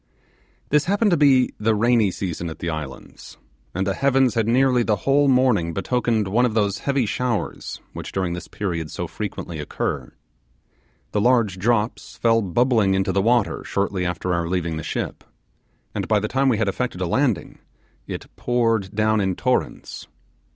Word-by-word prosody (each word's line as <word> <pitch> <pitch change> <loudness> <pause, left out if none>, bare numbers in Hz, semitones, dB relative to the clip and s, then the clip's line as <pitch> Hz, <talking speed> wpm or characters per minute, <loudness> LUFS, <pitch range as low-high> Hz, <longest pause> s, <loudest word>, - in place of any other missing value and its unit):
This 150 0 +3
happened 205 +3 +2
to - - +5
be 135 -5 +4
the 110 +1 +2
rainy 115 -1 +3
season 85 -2 -4
at 80 - -8
the 85 - -3
islands, 75 -4 -8 0.4
and 95 +1 0
the 100 - 0
heavens 135 0 +2
had 115 -2 0
nearly 125 +1 +3
the 110 -2 +2
whole 140 +1 +4
morning 125 -11 +2
betokened 115 0 0
one 115 +6 +2
of 120 -3 +1
those 100 -3 +1
heavy 140 -3 0
showers 115 +1 -3
which - - -7
during 90 -3 -1
this 85 - -6
period 85 -6 -3
so - - -4
frequently 85 -3 -6
occur. 75 - -3 1.0
The 105 - 0
large 115 -5 +2
drops 110 +2 0
fell 115 -1 +3
bubbling 105 0 +2
into 95 0 +1
the 95 +1 +1
water 115 +1 +1
shortly 100 -2 -1
after 90 0 -2
our 85 -1 0
leaving 85 -3 -1
the - - -4
ship, - - -4 0.7
and - - -3
by 110 -1 +3
the 110 - -2
time 135 +3 +2
we 115 - +2
had 110 -1 0
affected 100 -1 -2
a 90 - -1
landing 120 +2 0 0.5
it - - -5
poured 115 -5 0
down 110 0 +2
in 95 -2 0
torrents. 125 +5 -2
110 Hz, 170 wpm, -22 LUFS, 95-125 Hz, 1.0 s, to